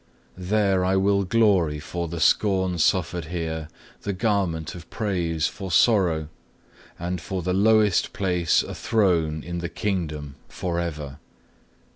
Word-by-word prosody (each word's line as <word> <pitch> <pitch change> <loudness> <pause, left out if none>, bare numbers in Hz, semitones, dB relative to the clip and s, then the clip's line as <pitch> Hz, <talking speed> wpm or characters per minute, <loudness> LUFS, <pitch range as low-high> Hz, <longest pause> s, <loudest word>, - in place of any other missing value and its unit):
There 95 0 +1
I 95 +1 +2
will 100 +1 +2
glory 95 -8 +2
for 85 +3 -4
the 85 +1 -5
scorn 95 0 +2
suffered 85 0 +1
here, 80 -2 -4 0.3
the 100 - -3
garment 95 -6 -1
of 85 -2 -11
praise 85 -6 -1
for 95 +3 -4
sorrow, 85 -7 +3 0.7
and 90 0 -3
for 95 +1 -4
the 90 +1 0
lowest 105 0 +3
place 90 -5 +1
a - - -7
throne 85 -8 +1
in 85 +1 -4
the 85 0 -4
Kingdom, 75 -8 -3
for 85 -2 -3
ever. 75 -4 -5
90 Hz, 135 wpm, -24 LUFS, 80-100 Hz, 0.7 s, sorrow